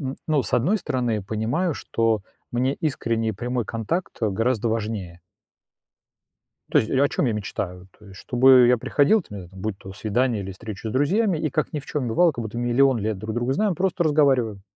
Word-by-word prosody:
м, 135 Hz, -1 st, -4 dB
ну, 150 Hz, -4 st, +2 dB
с -, -, -6 dB
одной 175 Hz, -, +3 dB
стороны, 120 Hz, -, -1 dB
понимаю, 115 Hz, -, -1 dB
что 115 Hz, -3 st, 0 dB, 0.3 s
мне 130 Hz, +3 st, +1 dB
искренний 115 Hz, -7 st, -1 dB
и -, -, -4 dB
прямой 120 Hz, +2 st, -3 dB
контакт 130 Hz, -, -3 dB
гораздо 115 Hz, +2 st, 0 dB
важнее. 105 Hz, -6 st, -4 dB, 1.5 s
То -, -, +4 dB
есть, 110 Hz, -, -2 dB
о 140 Hz, +2 st, +3 dB
чём 135 Hz, -, 0 dB
я 115 Hz, -, 0 dB
мечтаю? 95 Hz, -3 st, -5 dB
То 105 Hz, -, -18 dB
есть, 95 Hz, 0 st, -12 dB
чтобы 125 Hz, 0 st, +5 dB
я 125 Hz, -1 st, +4 dB
приходил, 145 Hz, -, +3 dB
там 105 Hz, -9 st, -9 dB
е 90 Hz, -1 st, -11 dB
будь 95 Hz, +1 st, -4 dB
то 95 Hz, 0 st, -10 dB
свидание 110 Hz, +1 st, 0 dB
или 95 Hz, -, -6 dB
встреча 110 Hz, +2 st, -7 dB
с -, -, -5 dB
друзьями, 180 Hz, -, +2 dB
и 155 Hz, -, -1 dB
как 155 Hz, +5 st, -1 dB
ни 150 Hz, -, -3 dB
в 140 Hz, -, -13 dB
чём 135 Hz, -5 st, -2 dB
бывало, 170 Hz, +8 st, +4 dB
как 120 Hz, -, -5 dB
будто 110 Hz, +2 st, -6 dB
миллион 120 Hz, +2 st, +3 dB
лет 105 Hz, -1 st, -2 dB
друг 110 Hz, +2 st, -5 dB
друга 120 Hz, +2 st, 0 dB
знаем, 210 Hz, +3 st, +1 dB
просто 185 Hz, 0 st, 0 dB
разговариваем. 135 Hz, -9 st, +2 dB
120 Hz, 200 wpm, -23 LUFS, 110-140 Hz, 1.5 s, чтобы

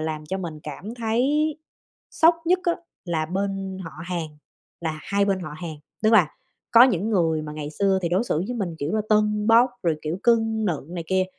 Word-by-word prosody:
làm 155 Hz, -1 st, -4 dB
cho 190 Hz, +3 st, -3 dB
mình 160 Hz, -4 st, -6 dB
cảm 180 Hz, +10 st, -7 dB
thấy 265 Hz, +7 st, +1 dB, 0.6 s
sốc 330 Hz, +1 st, +5 dB
nhất 365 Hz, +2 st, +4 dB
á, 345 Hz, -, +3 dB, 0.3 s
là 160 Hz, -3 st, -1 dB
bên 195 Hz, +1 st, -3 dB
họ 165 Hz, -, -7 dB
hàng, 175 Hz, -3 st, -3 dB, 0.5 s
là 160 Hz, -2 st, -3 dB
hai 200 Hz, 0 st, +1 dB
bên 195 Hz, -2 st, 0 dB
họ 155 Hz, -3 st, -6 dB
hàng. 160 Hz, -2 st, -6 dB, 0.3 s
Tức 215 Hz, +1 st, +4 dB
là 180 Hz, -8 st, +6 dB, 0.4 s
có 235 Hz, +1 st, +8 dB
những 220 Hz, -4 st, +3 dB
người 165 Hz, -6 st, +2 dB
mà 150 Hz, 0 st, -6 dB
ngày 150 Hz, -1 st, -5 dB
xưa 195 Hz, +3 st, +1 dB
thì 170 Hz, -, 0 dB
đối 185 Hz, +7 st, +1 dB
xử 155 Hz, -, 0 dB
với 245 Hz, -, -3 dB
mình 185 Hz, -7 st, -3 dB
kiểu 145 Hz, +3 st, -2 dB
là 215 Hz, -, +2 dB
tâng 210 Hz, 0 st, +2 dB
bốc, 235 Hz, +2 st, +6 dB
rồi 165 Hz, -3 st, +1 dB
kiểu 160 Hz, +4 st, -3 dB
cưng 225 Hz, -2 st, +2 dB
nựng 165 Hz, -3 st, -3 dB
này 170 Hz, -2 st, -4 dB
kia, 190 Hz, +1 st, +2 dB
190 Hz, 210 wpm, -24 LUFS, 160-220 Hz, 0.6 s, có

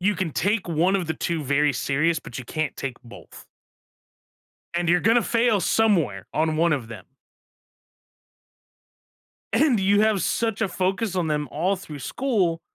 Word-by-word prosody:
you 205 Hz, +3 st, +2 dB
can 185 Hz, -4 st, -2 dB
take 200 Hz, +5 st, 0 dB
1 170 Hz, +4 st, +2 dB
of 180 Hz, -4 st, -3 dB
the 160 Hz, -, -2 dB
2 165 Hz, -2 st, -2 dB
very 145 Hz, +1 st, +2 dB
serious, 150 Hz, +6 st, 0 dB
but 120 Hz, -, -9 dB
you 130 Hz, -, -7 dB
can't 155 Hz, +6 st, -3 dB
take 130 Hz, -3 st, -5 dB
both. 120 Hz, -, -13 dB, 1.3 s
And 175 Hz, 0 st, -1 dB
you're 175 Hz, +1 st, +3 dB
gonna 230 Hz, +3 st, +4 dB
fail 230 Hz, -3 st, +2 dB
somewhere 170 Hz, -, +1 dB
on 155 Hz, 0 st, +1 dB
one 165 Hz, +2 st, +2 dB
of 125 Hz, -6 st, -3 dB
them. 110 Hz, -5 st, -10 dB, 2.5 s
And 275 Hz, -8 st, +3 dB
you 200 Hz, +2 st, +3 dB
have 215 Hz, -3 st, +2 dB
such 225 Hz, -2 st, -1 dB
a 225 Hz, -, +2 dB
focus 190 Hz, +3 st, -1 dB
on 175 Hz, -3 st, 0 dB
them 150 Hz, -1 st, -1 dB
all 180 Hz, +6 st, 0 dB
through 155 Hz, -6 st, -9 dB
school, 185 Hz, -, -1 dB
175 Hz, 160 wpm, -24 LUFS, 150-205 Hz, 2.5 s, gonna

